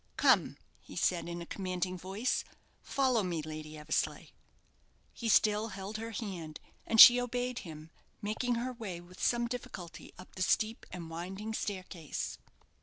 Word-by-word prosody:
"Come," - - +4 0.2
he - - -13
said, 170 -2 +1
in 170 0 -5
a - - -10
commanding 185 0 -3
voice. 195 +7 -1 0.4
"Follow 260 -4 +2
me, 175 -5 -2
Lady 155 0 -7
Eversleigh." 150 - -1 0.8
He 230 - -3
still 215 0 +4
held 195 0 -6
her 225 +1 -5
hand, 185 -9 -5 0.3
and 225 - +2
she 245 +2 +12
obeyed 245 0 -2
him, 160 -2 -10 0.3
making 225 +4 -1
her 250 +2 -2
way 205 -8 -6
with 175 +1 -13
some 240 0 +2
difficulty 195 -8 -7
up 185 - -13
the 185 - -7
steep 215 +4 +1
and 170 -3 -7
winding 190 +6 -5
staircase. 185 -7 -4
195 Hz, 150 wpm, -32 LUFS, 170-230 Hz, 0.8 s, she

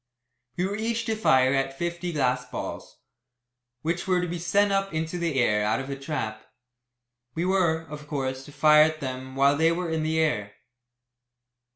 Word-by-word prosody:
We 180 - +1
were 200 +2 -2
each 230 +1 -1
to 220 - 0
fire 130 -11 +4
at 135 0 -1
fifty 175 +2 -3
glass 125 -5 +1
balls, - - -6 0.9
which 170 +3 -2
were 185 -1 +3
to 180 - -1
be 175 0 -4
sent 200 +4 +2
up 195 0 0
into 160 +2 -2
the 165 -6 0
air 105 -3 +2
out 110 +3 +1
of 135 +1 -5
a - - -2
trap. 130 -7 -4 0.9
We 170 +2 -1
were, 180 -4 +2
of 150 -2 -10
course, 130 -2 -3
to - - -12
fire 150 +1 +6
at 155 0 +3
them 130 -1 -6
while 140 +1 +4
they 160 +2 +3
were 170 0 -2
in 160 -1 0
the 160 +1 0
air. 105 -11 0
155 Hz, 185 wpm, -26 LUFS, 135-175 Hz, 0.9 s, fire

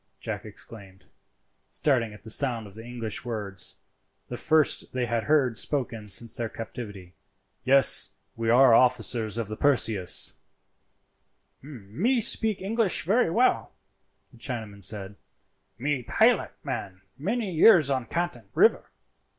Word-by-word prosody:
Jack 110 -2 -6
exclaimed, 95 -3 -10 0.6
starting 125 -7 0
at 105 -1 -14
the 110 - -2
sound 120 -4 0
of 100 - -13
the 110 +2 -11
English 115 -3 -5
words, 105 -5 -4 0.5
the 125 - -5
first 155 +3 +1
they 125 -1 -1
had 115 -2 -2
heard 130 -4 +2
spoken 115 -7 -2
since 115 +3 0
their 115 -1 -3
captivity. 105 -5 -9 0.5
"Yes, 135 +1 +5 0.2
we 115 0 -2
are 125 +1 +6
officers 115 -3 +2
of 115 -3 -3
the 110 - -6
Perseus." 110 -9 +1 1.3
"Me 145 - -2
speeke 215 -2 +1
English 195 -6 +1
velly 215 +3 +2
well," 240 +9 +1 0.6
the 120 - -18
Chinaman 110 -5 -6
said; 100 0 -3 0.6
"me 140 +2 -2
pilot 120 - +2
man 95 -2 -6
many 205 - -3
years 160 -4 +5
on 130 -3 -2
Canton 145 - -4
river. - - +3
120 Hz, 130 wpm, -26 LUFS, 110-145 Hz, 1.3 s, are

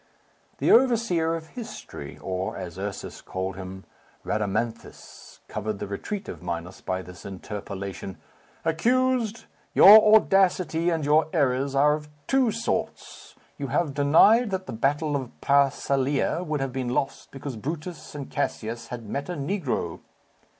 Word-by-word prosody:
The - - +2
overseer 225 -10 +3
of 160 -1 -7
history, 220 - -8
or, 95 0 -3
as 90 -2 -7
Ursus 100 0 -5
called 95 0 -4
him, 95 0 -8 0.4
Rhadamanthus, 110 +2 -4
covered 105 0 -3
the - - -4
retreat 190 - -5
of 80 - -7
Minos 85 +1 -5
by 95 0 -3
this 90 -1 -12
interpolation, 100 -1 -6 0.5
"Accused! 235 +6 +1 0.3
your 215 +2 +9
audacity 185 -5 +3
and 165 -3 -1
your 150 +1 +4
errors 135 -3 +1
are 145 +2 +5
of 150 0 -5 0.2
two 265 -3 +3
sorts. 230 +2 -4 0.2
You 140 - -3
have 145 +3 0
denied 165 - +5
that 190 -1 -3
the - - -6
battle 145 +6 0
of 130 -4 -4
Pharsalia 140 +2 +2
would 155 -4 -2
have 135 -2 -2
been 130 -2 -2
lost 125 +2 -2
because 135 -1 -7
Brutus 155 +6 -6
and 140 -2 -5
Cassius 115 +1 -3
had 120 -2 -7
met 140 - -4
a - - -2
negro." 140 - -2
140 Hz, 140 wpm, -26 LUFS, 105-175 Hz, 0.5 s, your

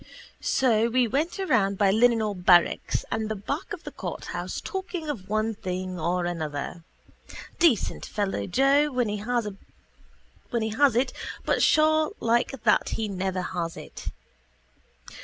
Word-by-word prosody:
So 230 -3 +2
we 250 0 +2
went 300 - -1
around 210 - +2
by 195 -1 +4
the 205 - +1
Linenhall 225 -3 +3
barracks 175 -1 +4
and 220 -1 -1
the 220 - -2
back 280 - -4
of 365 -5 -6
the - - -7
courthouse - - -5
talking 365 -4 -5
of 200 -8 -9
one 215 +1 0
thing 185 -2 -4
or 175 +2 0
another. 160 -1 -4 0.8
Decent 325 - +2
fellow 200 -2 -2
Joe 275 +8 +3
when 250 -4 0
he 210 - -2
has 210 - -3
it 255 +1 +1 0.3
but - - +1
sure 310 +3 +4
like 235 +1 0
that - - +3
he 220 -1 -1
never 190 -1 -2
has 170 -3 -4
it. - - -10
220 Hz, 140 wpm, -26 LUFS, 185-260 Hz, 0.8 s, by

